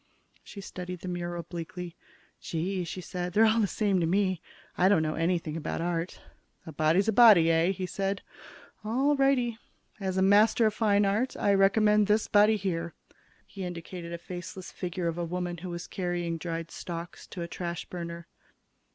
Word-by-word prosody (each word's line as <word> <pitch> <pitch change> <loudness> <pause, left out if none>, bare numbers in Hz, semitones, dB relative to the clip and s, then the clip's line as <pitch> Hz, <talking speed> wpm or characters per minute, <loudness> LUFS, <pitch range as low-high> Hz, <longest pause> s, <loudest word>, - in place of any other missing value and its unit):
She 200 - -10
studied 180 -2 -7
the - - -7
mural 175 -1 -4
bleakly. 175 +1 -7 0.4
"Gee," 180 +3 -2
she 185 +2 -6
said, 180 0 -4
"they're 220 +3 +5
all 220 +1 +3
the 210 - +3
same 200 -2 +1
to 165 - +1
me. 185 -1 +1 0.3
I 185 +1 +4
don't 200 -6 +4
know 155 0 -1
anything 165 -2 -1
about 160 -2 -3
art." 170 +1 -2 0.5
"A 160 - -7
body's 160 +6 +2
a - - +4
body, 200 -8 +7
eh?" 165 +1 +3
he 190 -1 -2
said. 195 +2 -2 0.6
"All 265 +7 +2
righty. 255 -4 +2 0.4
As 190 -2 -2
a 190 - +3
master 210 +4 +5
of 215 - +2
fine 210 -2 +3
art, 215 +6 0
I 200 - +2
recommend 210 +1 +4
this 210 +1 +2
body 210 +1 +5
here." 170 -4 -3 0.5
He 195 - -8
indicated 175 0 -6
a 170 - -4
faceless 180 +1 -8
figure 180 -1 -3
of 165 +1 -2
a - - -1
woman 175 +1 -3
who 180 +2 -7
was 175 0 -5
carrying 175 -2 -3
dried 165 0 -4
stalks 170 0 -7
to 175 - -6
a - - -5
trash 170 0 -5
burner. 170 -1 -7
180 Hz, 180 wpm, -28 LUFS, 170-205 Hz, 0.6 s, body